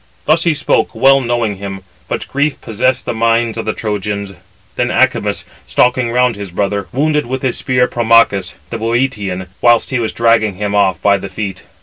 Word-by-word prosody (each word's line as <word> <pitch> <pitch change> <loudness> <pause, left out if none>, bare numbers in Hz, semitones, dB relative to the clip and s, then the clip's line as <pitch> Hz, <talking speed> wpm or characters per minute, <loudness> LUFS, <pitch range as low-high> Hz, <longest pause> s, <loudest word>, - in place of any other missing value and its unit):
Thus 165 +3 +2
he 165 -2 +2
spoke, - - 0
well 135 0 +5
knowing 120 -4 -1
[him], 95 0 -6 0.3
but - - -4
grief 145 +1 -1
possessed 130 +4 -1
the - - -2
minds 115 0 +1
of - - -4
the 110 - -1
Trojans. 100 -2 -3 0.4
Then - - 0
Acamas, - - +1 0.2
stalking 125 - +2
round 125 0 +2
his 100 -1 -7
brother, 100 +2 -2
wounded 150 +1 0
with 130 +2 -4
his 130 - -1
spear 125 -2 +1
Promachus, 115 -5 +2 0.2
the 115 - -4
Bœotian; 110 -6 -1 0.2
whilst 120 +1 +3
he 125 - 0
was 115 -2 -1
dragging 115 -3 +2
him 100 +1 -3
off 100 -2 +2
by 100 -1 +4
the 100 - -7
feet. 95 0 -5
115 Hz, 185 wpm, -15 LUFS, 100-125 Hz, 0.4 s, well